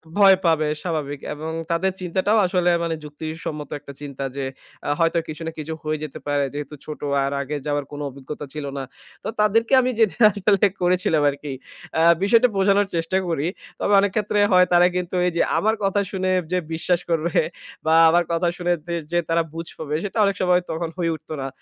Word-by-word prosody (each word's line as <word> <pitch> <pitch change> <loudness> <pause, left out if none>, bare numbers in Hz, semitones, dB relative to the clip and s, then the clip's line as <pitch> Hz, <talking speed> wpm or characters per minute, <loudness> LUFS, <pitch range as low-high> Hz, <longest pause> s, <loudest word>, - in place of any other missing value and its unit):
ভয় 200 -2 +7
পাবে 160 -2 +3 0.2
স্বাভাবিক, 150 -5 -3
এবং 155 +2 -5 0.2
তাদের 175 +3 +1
চিন্তাটাও 190 +4 +1
আসলে 180 -1 +2
মানে 165 -1 -1
যুক্তি 150 +1 -8 0.2
সম্মত 150 -2 -5
একটা 140 -1 -11
চিন্তা 140 -2 -6
যে, 140 - -3 0.4
আ - - -1
হয়তো 165 0 +3
কিছু 155 +1 -7
না - - -2
কিছু 155 +1 -4
হয়ে 155 0 -1
যেতে 150 - -7
পারে 145 -1 +1
যেহেতু 145 0 -6
ছোট 150 - -7 0.2
আর 135 - -1
আগে 145 +2 -4
যাওয়ার 145 -1 -1
কোন 145 - -7
অভিজ্ঞতা 140 +2 -8
ছিল 150 -1 -5
না। 135 - -3 0.4
তো, - - -5
তাদেরকে 225 +4 +2
আমি 255 0 0
যেটা 220 -4 +3 0.2
আসলে 200 0 +3 0.2
করেছিলাম 175 -4 +2
আরকি। 140 0 -5 0.5
আ - - +4 0.2
বিষয়টা 230 +5 +5
বোঝানোর 200 +1 +3
চেষ্টা 165 +3 0
করি। 165 -2 -1 0.3
তবে 205 - +1
অনেক 200 -1 +2
ক্ষেত্রে 210 -1 +1
হয় 180 0 +6
তারা 175 0 +6
কিন্তু 180 0 -2
এই - - +1
যে, - - +3 0.2
আমার 220 +1 +2
কথা 195 +1 +2
শুনে 185 -1 -1 0.2
যে, 180 - +2 0.2
বিশ্বাস 175 +2 +1
করবে 165 0 0 0.5
বা 160 - +3 0.2
আমার 175 +2 +4
কথা 170 +1 +1
শুনে 175 0 0 0.4
যে 175 - +2
তারা 165 0 +2
বুঝ 165 +1 -6
পাবে 150 -1 -3
সেটা 205 +2 -4
অনেক 200 0 +1
সময় 180 -1 +3
তখন 165 +1 -3
হয়ে 170 -2 0
উঠত 155 - -16
না। 135 - -3
170 Hz, 195 wpm, -22 LUFS, 150-190 Hz, 0.5 s, ভয়